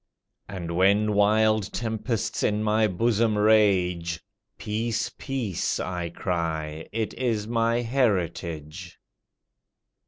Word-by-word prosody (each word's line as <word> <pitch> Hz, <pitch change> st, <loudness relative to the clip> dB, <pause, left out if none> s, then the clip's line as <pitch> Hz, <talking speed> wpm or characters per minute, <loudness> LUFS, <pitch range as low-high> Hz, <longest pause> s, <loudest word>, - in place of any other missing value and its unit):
And 85 Hz, -4 st, -5 dB
when 100 Hz, +4 st, +3 dB
wild 110 Hz, 0 st, +3 dB
tempests 110 Hz, 0 st, -2 dB
in 105 Hz, 0 st, +1 dB
my 110 Hz, 0 st, +3 dB
bosom 110 Hz, +2 st, +1 dB
rage, 90 Hz, -6 st, +3 dB, 0.4 s
"Peace, 115 Hz, +2 st, -2 dB
peace," 125 Hz, -, -2 dB
I 90 Hz, -2 st, -3 dB
cry, 80 Hz, -3 st, -3 dB
"it 110 Hz, 0 st, -2 dB
is 115 Hz, -4 st, -1 dB
my 115 Hz, +1 st, +1 dB
heritage." 90 Hz, -, -2 dB
105 Hz, 95 wpm, -26 LUFS, 90-110 Hz, 0.4 s, when